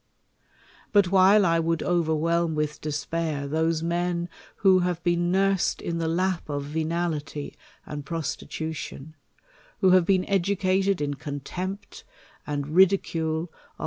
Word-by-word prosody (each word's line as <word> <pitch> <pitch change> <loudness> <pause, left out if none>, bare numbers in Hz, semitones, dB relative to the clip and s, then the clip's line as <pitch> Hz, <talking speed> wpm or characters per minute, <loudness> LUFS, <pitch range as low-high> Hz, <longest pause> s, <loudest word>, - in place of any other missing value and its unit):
But 200 -4 +4
while 195 +2 +6
1 165 -2 +2
would 165 -1 0
overwhelm 170 -1 +1
with 150 0 -2
despair 155 -1 -2
those 160 +2 0
men 175 0 -1 0.3
who 190 -2 +4
have 175 -1 -1
been 175 0 +1
nursed 195 0 +2
in 170 0 -3
the 165 - -1
lap 180 0 -1
of 145 -1 -2
venality 155 -1 -3 0.3
and 150 -1 -6
prostitution; 160 0 -5 0.6
who 190 -2 +4
have 185 -2 +5
been 190 -2 +3
educated 195 -1 +1
in 145 -1 -1
contempt 150 +8 -6 0.4
and 145 -1 -3
ridicule 165 -2 +2 0.3
of - - -34
170 Hz, 125 wpm, -26 LUFS, 155-185 Hz, 0.6 s, while